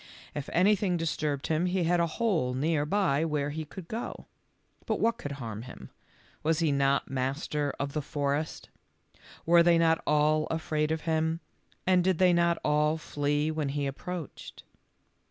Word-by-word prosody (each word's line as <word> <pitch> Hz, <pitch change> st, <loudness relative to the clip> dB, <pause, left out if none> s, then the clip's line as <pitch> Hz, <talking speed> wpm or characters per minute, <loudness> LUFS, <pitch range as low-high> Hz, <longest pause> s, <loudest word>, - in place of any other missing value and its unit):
If 145 Hz, -1 st, -5 dB
anything 190 Hz, 0 st, +3 dB
dis 165 Hz, -1 st, -1 dB
turbed 145 Hz, -3 st, -2 dB
him 160 Hz, +3 st, +1 dB
he 180 Hz, 0 st, 0 dB
had 175 Hz, +1 st, +2 dB
a 170 Hz, -, +2 dB
hole 170 Hz, -, +1 dB
near 150 Hz, +2 st, 0 dB
by 165 Hz, -5 st, +2 dB
where 150 Hz, -3 st, -1 dB
he 155 Hz, +1 st, -4 dB
could 170 Hz, +3 st, -10 dB
go. 225 Hz, +5 st, -5 dB, 0.6 s
But -, -, 0 dB
what 230 Hz, +1 st, +1 dB
could 145 Hz, -, -5 dB
harm 115 Hz, -6 st, -6 dB
him? 65 Hz, -, -11 dB, 0.5 s
Was 160 Hz, +1 st, +1 dB
he 160 Hz, -2 st, +2 dB
not 140 Hz, -1 st, +1 dB
master 140 Hz, +2 st, -1 dB
of 140 Hz, 0 st, -3 dB
the 150 Hz, -, -1 dB
forest? 145 Hz, +1 st, -2 dB, 0.8 s
Were 170 Hz, +1 st, +6 dB
they 170 Hz, 0 st, +5 dB
not 165 Hz, -1 st, +3 dB
all 150 Hz, +1 st, +3 dB
afraid 155 Hz, -1 st, -1 dB
of 160 Hz, -1 st, -1 dB
him, 160 Hz, 0 st, 0 dB, 0.5 s
and 185 Hz, -1 st, +4 dB
did 185 Hz, -1 st, +2 dB
they 180 Hz, 0 st, +5 dB
not 170 Hz, 0 st, +3 dB
all 150 Hz, +1 st, +2 dB
flee 145 Hz, 0 st, -1 dB
when 155 Hz, -3 st, -2 dB
he 145 Hz, 0 st, -2 dB
approached? 160 Hz, +3 st, -6 dB
155 Hz, 170 wpm, -29 LUFS, 145-170 Hz, 0.8 s, Were